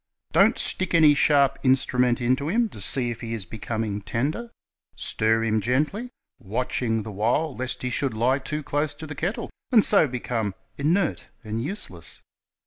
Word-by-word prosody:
"Don't - - +4
stick 185 -2 0
any 155 -3 +7
sharp 140 -1 +3
instrument 125 -2 +2
into 130 +4 +1
him, 230 +4 +2
to 105 - -8
see 120 +4 +1
if 120 - -7
he 115 -1 -3
is 105 -4 -5
becoming 110 -2 -4
tender. 145 - -2 0.5
.Stir 110 +1 +1
him 110 -1 +1
gently; 150 - 0 0.3
watching 115 +1 -1
the 110 - -7
while 120 +9 0
lest 130 +1 -4
he 125 - -1
should 135 -4 -1
lie 125 +5 +2
too 150 +3 -4
close 145 +1 -1
to 155 - -8
the 150 - -6
kettle, 175 - -3 0.2
and 225 -5 +6
so 200 -7 +5
be 125 -1 -4
come 110 -6 -2 0.2
inert 165 +5 0 0.2
and 110 +1 -3
useless. 140 - -6
130 Hz, 170 wpm, -25 LUFS, 115-150 Hz, 0.5 s, any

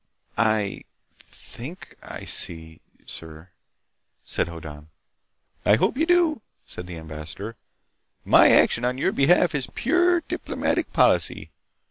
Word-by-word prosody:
"I... 110 -3 +1 0.4
think 145 +10 -10
I - - -8
see, 80 -1 -3 0.2
sir," 80 +2 -10 0.7
said - - 0
Hoddan. 80 -3 -10 0.7
"I 105 - +5
hope 115 - +1
you 320 +5 0
do," 345 -7 +3 0.2
said 90 - -8
the 85 -2 -7
ambassador. 80 +7 -8 0.7
"My - - +7
action 120 - +4
on 125 +1 0
your 135 - +1
behalf 170 +4 +3
is 140 -3 -2
pure 350 +5 +2
diplomatic - - -2
policy. - - +2
110 Hz, 115 wpm, -24 LUFS, -, 0.7 s, My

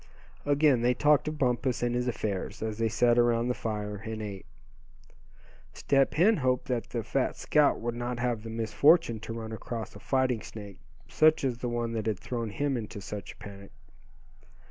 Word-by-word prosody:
Again 145 -3 +4
they 125 +1 +2
talked 150 +2 +3
of 155 0 -3
Bumpus 125 -2 0
and 120 0 +1
his 125 +1 -1
affairs, 105 -4 -3
as 110 0 -4
they 115 0 +1
sat 120 +2 +3
around 120 0 +2
the - - +2
fire, 105 -3 -4
and 110 +1 -6
ate. 100 -3 -7 1.3
Step 135 -1 +1
Hen 200 +8 +4
hoped 130 -2 0
that 120 -2 -2
the 115 -2 -3
fat - - -1
scout 150 -1 +2
would 120 +1 -3
not 120 +1 -3
have 120 -2 -1
the 115 - -8
misfortune 115 +4 +3
to 115 - -6
run 110 -1 -6
across 110 0 -6
a - - -10
"fighting 130 -4 0
snake," 100 -3 -10 0.3
such 155 -1 +4
as 125 -3 -1
the 120 - -2
one 120 -1 -2
that 110 -1 -3
had 110 -3 0
thrown 115 -2 -4
him 140 +4 -1
into 105 -2 -6
such 100 +1 -7
a - - -27
panic. 100 -1 -11
120 Hz, 190 wpm, -29 LUFS, 110-130 Hz, 1.3 s, Again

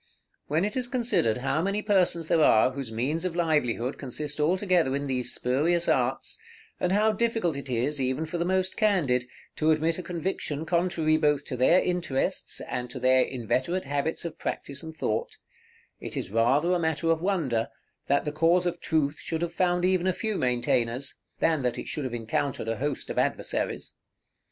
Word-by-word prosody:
When 160 +6 +1
it 210 - -3
is 255 -1 +1
considered 225 - +1
how 135 +4 0
many 200 +3 -1
persons 180 -5 +2
there 160 -1 +3
are 110 0 +5
whose 130 -3 -5
means 135 +9 -1
of 180 -2 -2
livelihood 145 -7 0
consist 145 +2 -4
altogether 175 -3 +2
in 140 0 -2
these 130 -2 -1
spurious 160 +7 +1
arts, 130 +1 0 0.4
and 180 - 0
how 210 +3 +4
difficult 225 -6 0
it 140 -1 -7
is, 130 +4 0
even 130 +4 -1
for 165 +2 -4
the - - +2
most 185 +1 0
candid, 160 - +2 0.3
to 155 - +2
admit 160 +2 +2
a - - -2
conviction 165 -4 -3
contrary 170 -2 +2
both 150 -2 +1
to 130 - -4
their 130 +9 +5
interests 170 -7 -1
and 125 0 -4
to 130 - -7
their 130 +1 +4
inveterate 130 - -1
habits 145 +4 -2
of 170 - -6
practice 140 0 -4
and 160 -1 -9
thought, 110 +1 -2 0.6
it - - -6
is - - -3
rather 135 - +3
a 180 - +2
matter 160 0 +1
of 165 0 +1
wonder, 155 - 0 0.4
that 140 +1 +2
the 150 - -1
cause 165 +4 +3
of 175 -1 -1
Truth 150 -2 0
should 165 0 -3
have 170 0 -3
found 180 0 +1
even 185 -1 +2
a 185 - +2
few 220 +3 -2
maintainers, 125 0 0 0.2
than 160 -3 +2
that 125 -2 -1
it - - -6
should 150 - -3
have 125 - -4
encountered 115 +2 -2
a 115 -1 -1
host 145 0 -3
of - - -1
adversaries. - - -2
155 Hz, 185 wpm, -27 LUFS, 130-175 Hz, 0.6 s, are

